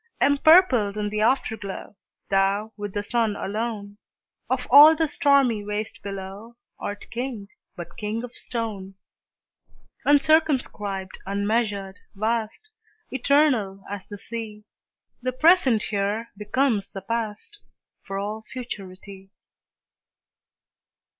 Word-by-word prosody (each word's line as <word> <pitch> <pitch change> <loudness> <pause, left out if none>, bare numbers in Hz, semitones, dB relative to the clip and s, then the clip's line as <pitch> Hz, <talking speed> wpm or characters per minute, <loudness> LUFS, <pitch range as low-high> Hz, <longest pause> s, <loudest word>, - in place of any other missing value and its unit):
Empurpled 285 - +5
in 210 0 -1
the 210 0 -2
Afterglow, 220 -5 -1 0.4
Thou, 200 +3 +1
with 205 -1 -5
the 205 - -1
Sun 225 -1 0
alone, 205 0 -4 0.5
Of 255 -1 0
all 295 +4 +10
the 320 0 +1
stormy 275 -7 +3
waste 210 +1 -4
below, 200 +3 -7 0.2
Art 205 0 -5
King, 235 -4 -5 0.3
but 175 -3 -9
king 215 +2 -3
of 245 - -9
stone! 205 -5 -5 1.1
Uncircumscribed, 275 -10 +1
unmeasured, 200 -1 -1 0.2
vast, 225 - -2 0.4
Eternal 255 -8 +2
as 200 -1 -7
the 205 - -8
Sea, 215 0 -7 0.6
The 255 +1 -2
present 270 - +4
here 210 +3 -2
becomes 210 0 0
the 195 - -7
past, 230 - -4 0.4
For 195 -1 -6
all 210 +2 -4
futurity. 195 -5 -8
215 Hz, 105 wpm, -24 LUFS, 200-250 Hz, 1.1 s, all